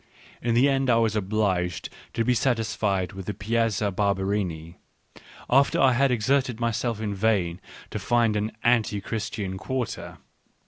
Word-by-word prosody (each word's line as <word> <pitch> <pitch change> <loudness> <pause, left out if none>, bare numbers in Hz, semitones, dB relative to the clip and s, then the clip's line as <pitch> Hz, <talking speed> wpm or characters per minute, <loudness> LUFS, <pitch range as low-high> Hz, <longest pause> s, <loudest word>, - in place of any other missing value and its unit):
In 115 -1 0
the 125 +4 +5
end 135 -1 +1
I 120 - +5
was 115 -2 +2
obliged 95 -4 -1 0.2
to 115 - 0
be 125 - +3
satisfied 110 -6 0
with 95 -1 -8
the 105 - -3
Piazza 110 -1 0
Barberini, 95 -4 -1 0.7
after 140 +2 +3
I 135 - +5
had 135 +3 +3
exerted 125 +1 +1
myself 115 -1 -1
in 105 -2 -2
vain 95 -4 0 0.3
to - - -3
find 115 -3 +2
an 105 +1 -1
anti 115 -4 +2
Christian 100 -2 -4
quarter. 130 0 -4
110 Hz, 145 wpm, -25 LUFS, 100-120 Hz, 0.7 s, the